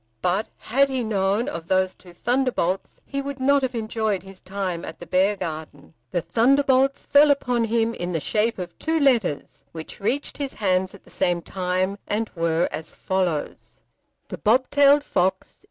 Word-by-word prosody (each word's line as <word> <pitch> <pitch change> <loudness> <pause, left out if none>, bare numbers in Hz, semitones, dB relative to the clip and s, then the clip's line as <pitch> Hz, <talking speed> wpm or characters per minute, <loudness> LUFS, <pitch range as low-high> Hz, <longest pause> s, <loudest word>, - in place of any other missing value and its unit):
But 190 +5 +1
had 275 +4 +2
he 260 -2 -1
known 205 +1 0
of 170 -1 -5
those 185 0 +2
two 180 - -16
thunderbolts 240 -3 -1
he 275 0 -3
would 280 -1 -6
not 280 +2 +3
have 260 -1 -2
enjoyed 220 -3 -1
his 195 -1 -13
time 185 -3 -4
at - - -7
the 175 - -10
Beargarden. 165 -6 -2 0.2
The 175 - -1
thunderbolts 270 - +2
fell 290 +1 +6
upon 250 -4 +2
him 230 0 +1
in 175 -4 -4
the 165 - 0
shape 215 +8 0
of 180 -2 -6
two 320 0 0
letters 235 - +1
which 160 -1 -8
reached 265 +8 -2
his 280 -2 -3
hands 185 -1 0
at 200 - -17
the - - -17
same 175 -1 0
time, 185 +2 -1
and 220 +1 -1
were 165 0 +1
as 160 - -6
follows: 180 -5 -3 0.5
The - - -6
Bobtailed 280 +5 +4
Fox. 190 -6 -1
205 Hz, 170 wpm, -24 LUFS, 180-260 Hz, 0.5 s, fell